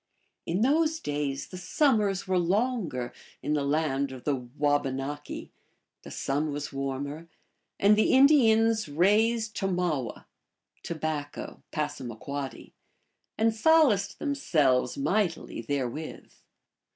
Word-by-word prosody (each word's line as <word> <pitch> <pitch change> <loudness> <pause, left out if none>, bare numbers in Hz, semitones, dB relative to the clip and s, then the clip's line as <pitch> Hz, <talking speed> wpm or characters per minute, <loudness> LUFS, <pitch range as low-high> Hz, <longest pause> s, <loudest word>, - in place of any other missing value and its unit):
In 175 +5 0
those 315 +5 +2
days 145 - -3
the 185 - -8
summers 205 - +1
were 185 -1 +2
longer 180 - -1 0.3
in 150 - 0
the 145 -2 +1
land 140 -2 0
of 130 -2 -9
the 145 - +1
Wabanaki, 140 +2 -2 0.5
the - - -11
sun 145 +3 -1
was 145 0 -5
warmer, 140 +4 -4 0.5
and 205 +1 +6
the 215 - +3
Indians 225 - +5
raised 215 +7 +2
tomawe 175 - -2 0.6
(tobacco, 155 -3 -4
P.), 140 -2 -5 0.6
and 225 0 +3
solaced 225 - +3
themselves 160 - +1
mightily 205 - -1
therewith. 145 +1 -4
160 Hz, 105 wpm, -28 LUFS, 140-220 Hz, 0.6 s, and